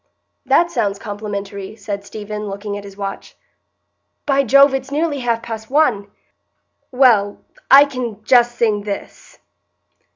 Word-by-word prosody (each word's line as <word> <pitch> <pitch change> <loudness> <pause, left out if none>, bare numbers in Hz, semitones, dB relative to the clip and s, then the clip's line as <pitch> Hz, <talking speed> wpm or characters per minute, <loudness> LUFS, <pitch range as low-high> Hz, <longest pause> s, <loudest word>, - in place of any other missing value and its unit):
"That 345 0 +3
sounds 200 -10 -1
complimentary," 200 -1 -6
said 200 -2 -6
Stephen, 210 0 -7
looking 200 +1 -5
at 205 - -7
his 200 -1 -12
watch. 195 -1 -7 0.9
"By 275 -1 +2
Jove, 275 +2 +5
it's 270 0 -3
nearly 295 0 -1
half 235 -2 -1
past 220 -1 -7
one! 255 -9 +1 0.8
Well, 235 -6 +3 0.3
I 280 +1 +9
can 245 -6 -6
just 240 +1 +3
sing 215 -3 +1
this." 200 -1 -8
220 Hz, 130 wpm, -18 LUFS, 205-265 Hz, 0.9 s, I